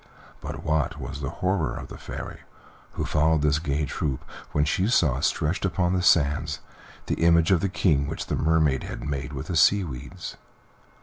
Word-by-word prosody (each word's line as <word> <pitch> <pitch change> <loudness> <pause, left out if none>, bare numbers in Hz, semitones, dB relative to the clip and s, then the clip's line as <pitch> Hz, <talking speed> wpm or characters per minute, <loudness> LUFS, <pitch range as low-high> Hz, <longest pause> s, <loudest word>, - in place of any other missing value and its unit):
But - - -7
what 80 -4 0
was 75 - -6
the 70 - -2
horror 90 -1 -1
of - - -7
the - - -9
Fairy, - - -7 0.5
who - - -3
followed 75 0 +2
this 75 0 +3
gay 75 -1 -1
troop, 70 -2 -3 0.3
when 75 0 +2
she 90 +6 +1
saw, 75 - +3
stretched 80 +6 0
upon 90 -1 +1
the 90 - +1
sands, 75 -3 +3 0.5
the - - -1
image 85 +1 +5
of 95 - +5
the 95 - 0
King 75 -7 +2
which 80 - -4
the - - -1
Mermaid 80 -4 +2
had - - -6
made 70 0 -3
with 70 -2 -5
the 90 - -3
sea 95 +6 +5
weeds. 65 -8 -7
80 Hz, 185 wpm, -26 LUFS, 75-85 Hz, 0.5 s, image